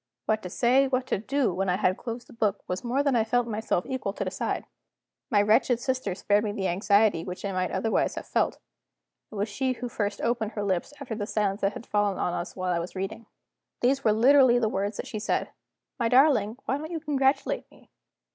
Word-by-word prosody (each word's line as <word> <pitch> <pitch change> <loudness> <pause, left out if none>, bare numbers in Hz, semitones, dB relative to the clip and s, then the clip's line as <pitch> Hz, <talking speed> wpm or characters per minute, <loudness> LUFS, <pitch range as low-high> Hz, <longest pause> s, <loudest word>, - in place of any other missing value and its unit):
What 215 0 +1
to 180 - -6
say, 255 +7 +3
what 255 -1 0
to 255 - -1
do, 260 -1 0
when 190 +1 -1
I 180 - +2
had 185 0 +2
closed 235 +2 -6
the - - -16
book, 210 -3 -1
was 180 +1 -3
more 255 +4 +1
than 280 -3 +2
I 225 - +4
felt 245 +2 +1
myself 220 -5 -1
equal 260 -6 -3
to - - -3
decide. - - -2 0.6
My 205 -5 +4
wretched 230 +3 +3
sister 255 -7 -2
spared 205 +2 +2
me 210 - -1
the 195 -2 -1
anxiety 200 0 +3
which 180 +2 -6
I 200 - -1
might 185 -1 -1
otherwise 215 +4 0
have - - -6
felt. - - 0 0.7
It - - -9
was 205 +1 -1
she 255 +5 -1
who 245 0 -5
first 210 -4 -2
opened 235 -2 -1
her 205 - -3
lips, 190 +1 -1
after 265 -5 -5
the 210 -2 -3
silence 205 -2 -1
that 195 +1 +1
had 235 - -8
fallen 205 -2 +1
on 175 - -1
us 175 - -4
while 185 -1 -1
I 170 - 0
was 170 +3 -6
reading. 200 +4 -5 0.5
These 270 +2 +2
were 215 - +4
literally 250 +2 +6
the 235 -2 +2
words 200 +1 -2
that - - -4
she 215 - -5
said: 215 - -1 0.5
"My 230 -1 +1
darling, 250 -4 +4
why 270 - 0
don't 310 +1 -6
you 335 -2 -3
congratulate 280 -3 0
me?" - - -22
220 Hz, 225 wpm, -27 LUFS, 200-255 Hz, 0.7 s, literally